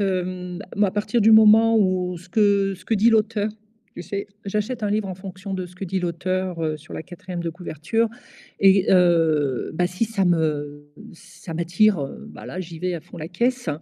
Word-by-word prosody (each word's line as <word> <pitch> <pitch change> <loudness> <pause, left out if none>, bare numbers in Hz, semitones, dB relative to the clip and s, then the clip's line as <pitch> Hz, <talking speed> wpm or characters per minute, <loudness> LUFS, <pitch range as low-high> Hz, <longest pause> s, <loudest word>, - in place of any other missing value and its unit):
hem, 185 -1 -2 0.2
moi 205 0 +4
à - - -3
partir 210 +3 0
du 220 +1 +6
moment 220 +1 +7
où 185 -3 +1
ce 175 +2 -14
que 200 -1 +2
ce 185 - -18
que 225 - 0
dit 220 +3 +4
l'auteur, 220 -1 +1 0.5
tu 175 - -6
sais? 200 +1 -5 0.2
J'achète 210 +3 -2
un 205 - 0
livre 210 -1 0
en 185 - -5
fonction 190 +1 -8
de 185 -1 -3
ce 180 - -16
que 195 - -6
dit 190 +1 -2
l'auteur, 180 0 -2
heu, 155 -1 -1
sur 150 +1 -12
la - - -5
quatrième 180 0 -8
de 170 - -2
couverture 180 +6 -2 0.5
et 195 -1 +5
heu, 160 -7 +2
ben, 180 +2 +1
si 180 +5 -1
ça 215 -3 -1
me 145 -4 -1 0.2
ça 170 0 -11
m'attire, 170 +3 +2
heu, 135 - -6
ben, - - -11
là, 185 - -5
j'y 170 -2 -8
vais 180 +1 -2
à 170 - -5
fond 175 - -14
la 155 - -6
caisse. 240 +6 -1
185 Hz, 210 wpm, -23 LUFS, 170-205 Hz, 0.5 s, moment